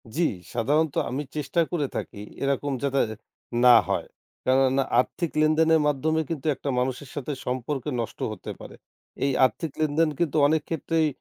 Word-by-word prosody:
জি, 165 - 0 0.3
সাধারণত 145 +6 +1
আমি 135 +4 -2
চেষ্টা 150 +3 0
করে 165 -5 0
থাকি 100 - -5 0.2
এরকম 140 +1 0
যাতে 140 -1 +1 0.6
না 125 -1 +9 0.2
হয়। - - 0 0.4
কেননা? 130 +1 +3 0.2
আর্থিক 165 +6 -1
লেনদেনের 160 +1 +4
মাধ্যমে 155 +3 +1
কিন্তু 160 -2 -3
একটা 140 - -5
মানুষের 130 +2 -2
সাথে 145 0 -4
সম্পর্ক 130 +2 -2 0.2
নষ্ট 115 - -6
হতে 105 - -7
পারে। - - -10 0.5
এই 140 - +2
আর্থিক 155 +4 -2
লেনদেন 155 +1 +2
কিন্তু 165 -3 +1
অনেক 155 +1 +2
ক্ষেত্রেই 165 0 +1
145 Hz, 150 wpm, -25 LUFS, 130-160 Hz, 0.6 s, না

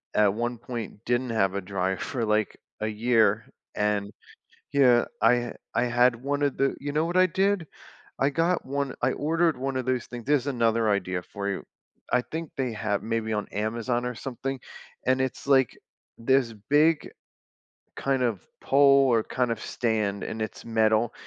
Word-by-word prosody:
at 105 -2 +4
one 120 +2 -2
point, 115 -2 -7
didn't 120 +1 0
have 95 -4 +1
a 100 - -2
dryer 95 0 -2
for, 120 +2 -3
like, 105 -1 0 0.2
a 110 - -1
year, 110 -1 +2 0.3
and 105 -1 0 0.6
yeah, 125 -4 +5 0.2
I 115 +2 +6
ha 120 0 -4 0.2
I - - +2
had 120 0 +3
one 140 +4 -2
of 140 -2 +1
the 135 0 +1
you 145 +1 -4
know 155 +2 +2
what 170 +1 -3
I 185 - +7
did? 190 0 +1 0.5
I 135 - +2
got 165 +5 +1
one 140 0 -2
I - - +3
ordered 165 +1 +1
one 135 0 -2
of 130 - -1
those 130 -2 0
things 120 -2 -8
there's 145 -2 +2
another 115 -4 +1
idea 95 -3 -1
for 100 +2 -5
you. 100 - -3 0.5
I 125 - +3
think 160 +3 -6
they 130 -3 -1
ha 105 -2 -1
maybe 115 -1 -2
on 105 -1 -1
Amazon 115 +4 -1
or 125 0 -3
something, 135 +2 -5 0.5
and 130 +1 +3
it's 130 +1 -2
like 135 -3 +3 0.4
this 125 0 +2 0.2
big 155 +2 +3 0.9
kind 135 -1 0
of 115 -7 0 0.2
pole 140 0 +5
or 115 - +3
kind 125 +2 -1
of 115 - -5
stand, 105 -4 -1
and 110 - -4
it's 110 - -6
metal, 110 0 +2
120 Hz, 180 wpm, -26 LUFS, 110-135 Hz, 0.9 s, I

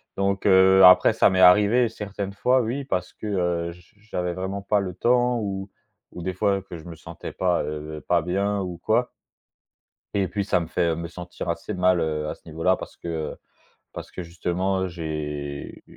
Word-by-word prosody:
donc 100 0 -1
heu, 95 0 +6
après, 90 +4 +8
ça 110 - +4
m'est 95 -1 +1
arrivé 105 +6 +6
certaines 100 -2 -6
fois 125 +6 +2
oui, 125 +5 -3
parce 90 -4 -3
que, 110 - -8
heu, 90 -4 -1
j 90 +3 -21
j'avais 90 -5 -3
vraiment 95 +2 -4
pas 105 0 +2
le 95 -2 -4
temps 125 0 +2
ou 95 -2 -4 0.4
ou 90 - -7
des 95 - -2
fois 100 +2 +1
que 90 -2 -9
je 80 - -13
me 85 -1 -8
sentais 85 0 -9
pas, 90 -4 +1
heu, 75 +1 -6
pas 85 -2 +3
bien 100 +3 0
ou 90 -2 -5
quoi 120 +6 +1 1.1
et 100 -3 +1
puis 100 +1 -2
ça 90 -3 +1
me 85 - -4
fait, 85 +1 0
heu, 80 - -1
me 85 0 -5
sentir 90 0 -8
assez 95 +4 -3
mal, 90 -1 +3
heu, 75 -1 -2
à - - -3
ce - - -25
niveau 80 +1 -7
là 95 +1 +4
parce - - -10
que 80 -2 -4 0.6
parce - - -8
que 90 - -6
justement 90 +3 -1
j'ai 75 -4 -5
90 Hz, 200 wpm, -24 LUFS, 85-100 Hz, 1.1 s, après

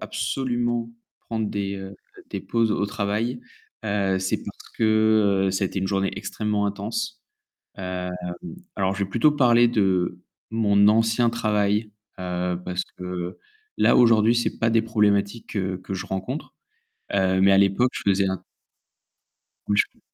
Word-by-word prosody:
absolument 120 -3 -2 0.4
prendre 110 -2 -1
des, 100 -1 -3
heu, 95 0 -8 0.4
des - - -3
pauses 115 -1 0
au 100 - 0
travail, 105 +5 -2 0.4
heu, 100 -2 +1
c'est 95 0 -1
parce - - -10
que, 110 -3 +3
heu, - - +2
ça 95 +1 0
a - - +2
été 95 - -4
une 95 - -1
journée 95 0 0
extrêmement 105 -1 -1
intense, 110 - -4 0.5
hem, 90 -2 -4 0.6
alors, 95 -1 0
je 100 - -1
vais 95 - -9
plutôt 120 +9 +4
parler 120 -4 +4
de 95 -6 +1 0.3
mon 105 -2 +4
ancien 115 +2 +3
travail, 105 -2 0 0.3
heu, 90 -1 -2
parce 90 0 -2
que 90 0 -5 0.4
là - - +5
aujourd'hui, 115 -1 +5
c'est 120 - -1
pas 115 - +2
des 115 0 +3
problématiques 105 -1 +1
que 95 -2 -1
que 95 +1 -8
je 95 - -5
rencontre, 95 0 -5 0.6
heu, 95 -1 +2
mais 100 +1 +6
à 95 - +6
l'époque 100 +6 +3
que - - -6
je - - +2
faisais 95 0 +2
un 95 -1 -3 1.2
Oui, 105 - +1
je - - +5
peux - - -30
100 Hz, 160 wpm, -24 LUFS, 95-115 Hz, 1.2 s, mais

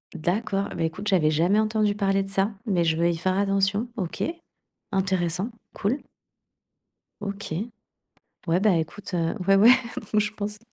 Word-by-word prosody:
D'accord, 195 +4 -1
et - - -7
bah 165 - -1
écoute, 195 +6 -2
j'avais 170 -6 +4
jamais 170 +7 +3
entendu 215 -1 +2
parler 195 -1 +1
de 195 - -9
ça, 195 +2 +1
mais 180 -6 +1
je 160 - +2
vais 170 +1 +2
y 165 - -3
faire 185 +3 0
attention. 200 +3 +1
OK, 180 -5 -3 0.7
intéressant, 185 +1 0 0.2
cool. 225 +8 0 1.2
OK, 200 -4 -5 0.9
ouais, 170 +3 +2
bah 205 -4 +4
écoute, 170 +5 -5
heu, 165 -1 0
ouais, 195 - +6
ouais, 215 +5 +8 0.4
moi, 215 - +4
je 210 0 0
pense. 210 0 -5
195 Hz, 160 wpm, -25 LUFS, 175-205 Hz, 1.2 s, ouais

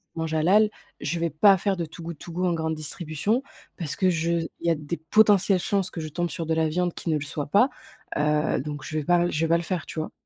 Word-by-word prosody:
je - - -5
mange 160 -1 -2
halal, 190 +7 +4 0.3
je 170 - -2
vais 170 0 0
pas 195 +6 +6
faire 195 +1 0
de 170 - -2
Too 160 +2 -11
Good 165 -1 -6
To 175 - -9
Go 180 +2 -1
en 180 - +2
grande 160 -1 -1
distribution, 155 - -2 0.4
parce 160 -5 -4
que 185 - +2
je 170 -1 0 0.3
il - - -4
y - - +5
a 165 - +3
des 150 +3 -5
potentielles 195 +2 +4
chances 190 +1 0
que 165 - -6
je 155 - -5
tombe 175 +3 -2
sur 165 +2 -4
de 160 - 0
la 160 0 +2
viande 175 +2 0
qui - - -5
ne 160 - +2
le - - -5
soit 145 0 -4
pas, 205 - +4 0.5
heu, 150 +1 +1
donc 150 +1 -6
je 155 - -6
vais - - +2
le - - -9
pas 175 +1 +3
je 150 - -2
vais - - 0
pas 170 - +5
le 170 - -3
faire, 170 -2 -3
tu - - -6
vois? 155 - -4
165 Hz, 285 wpm, -25 LUFS, 155-180 Hz, 0.5 s, pas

